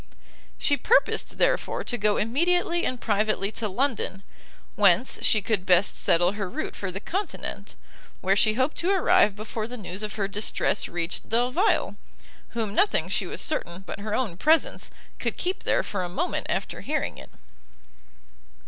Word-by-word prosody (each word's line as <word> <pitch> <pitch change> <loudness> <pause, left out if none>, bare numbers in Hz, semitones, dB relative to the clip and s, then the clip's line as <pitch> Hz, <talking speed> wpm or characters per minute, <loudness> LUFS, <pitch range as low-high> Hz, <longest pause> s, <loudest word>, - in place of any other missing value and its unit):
She 285 - +1
purposed, 470 - +2
therefore, - - +1
to 245 - -2
go 210 -3 +2
immediately 345 +8 +1
and 255 - -3
privately 210 -2 0
to 220 -1 -3
London, 215 -4 -1 0.5
whence 200 +4 +3
she 215 -3 +3
could 205 -3 0
best 185 +1 +3
settle 175 +2 +3
her 200 -2 -4
route - - -4
for 195 -2 -4
the 190 - -5
continent: 385 - -5 0.4
where 190 +1 +2
she 215 +2 +4
hoped 260 +5 0
to 350 - 0
arrive 365 - +4
before 215 +1 -5
the 250 +1 -7
news 190 -2 -6
of 210 -1 -4
her 200 -3 -1
distress 205 +2 0
reached 170 0 -3
Delvile, 250 - +1 0.6
whom 215 -3 -1
nothing, 405 - +2
she - - -1
was - - -4
certain, 185 - -2
but 195 - -7
her 210 +1 -3
own 215 -10 -2
presence, 315 - +2 0.3
could - - -2
keep 370 +2 -2
there - - +2
for 200 - -3
a 180 - -3
moment 175 - -2
after - - -2
hearing - - -2
it. - - -12
215 Hz, 165 wpm, -26 LUFS, 195-280 Hz, 0.6 s, she